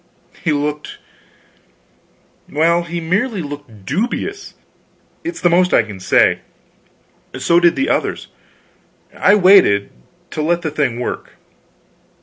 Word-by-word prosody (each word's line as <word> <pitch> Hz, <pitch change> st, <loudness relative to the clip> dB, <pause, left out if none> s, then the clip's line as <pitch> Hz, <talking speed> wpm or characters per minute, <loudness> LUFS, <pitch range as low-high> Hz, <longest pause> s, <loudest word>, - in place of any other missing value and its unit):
He 160 Hz, -, +1 dB
looked 150 Hz, 0 st, -3 dB, 1.5 s
well, 165 Hz, +3 st, +2 dB
he 170 Hz, 0 st, -5 dB
merely 185 Hz, +4 st, -1 dB
looked 145 Hz, -9 st, -10 dB
dubious, 245 Hz, -, -3 dB, 0.7 s
it's 335 Hz, +1 st, -5 dB
the -, -, +3 dB
most 180 Hz, +1 st, +3 dB
I -, -, +4 dB
can 105 Hz, -3 st, -10 dB
say; 95 Hz, -, +3 dB, 1.0 s
so 170 Hz, 0 st, +3 dB
did 175 Hz, -1 st, +4 dB
the 275 Hz, -, 0 dB
others. -, -, -1 dB, 0.9 s
I 205 Hz, -, +4 dB
waited 185 Hz, -, +5 dB, 0.4 s
to 155 Hz, -, -3 dB
let 170 Hz, +3 st, 0 dB
the 155 Hz, -, -2 dB
thing 140 Hz, -6 st, -1 dB
work. 125 Hz, -, -5 dB
170 Hz, 120 wpm, -17 LUFS, 145-185 Hz, 1.5 s, waited